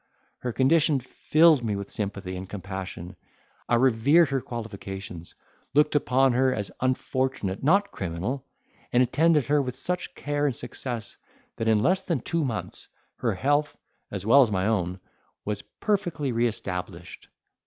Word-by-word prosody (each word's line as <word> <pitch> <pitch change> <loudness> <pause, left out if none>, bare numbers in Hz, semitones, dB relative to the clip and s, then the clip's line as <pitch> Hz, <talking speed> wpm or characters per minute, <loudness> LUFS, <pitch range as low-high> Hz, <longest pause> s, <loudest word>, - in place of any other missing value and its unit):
Her 125 - -3
condition 145 +3 +3
filled 155 +3 +3
me 105 -3 -1
with 100 0 -6
sympathy 100 -2 -4
and 95 +1 -7
compassion: 95 -2 -6 0.5
I 120 - +4
revered 135 +6 +4
her 135 -2 0
qualifications, 95 -7 -7 0.4
looked 150 +1 +4
upon 135 -2 +3
her 130 +1 +3
as 105 -5 -3
unfortunate, 130 -5 -1
not 195 +7 +3
criminal, 95 +9 -3 0.5
and 125 +1 +5
attended 150 +3 +3
her 145 +3 +3
with 125 -2 -4
such 180 +7 -4
care 145 0 -1
and 135 - -1
success, 120 -4 -5 0.4
that 115 - -2
in 110 -1 +3
less 185 +2 +3
than 170 -9 -2
two 165 +5 -1
months 115 -6 -4 0.3
her - - 0
health, 145 +2 +1 0.3
as 100 -1 -5
well 135 +6 +7
as 125 - +4
my 95 -2 0
own, 90 -4 0 0.5
was 105 -1 -2
perfectly 175 - -2
re 120 +1 +2
established. 90 -5 -6
125 Hz, 150 wpm, -26 LUFS, 100-145 Hz, 0.5 s, well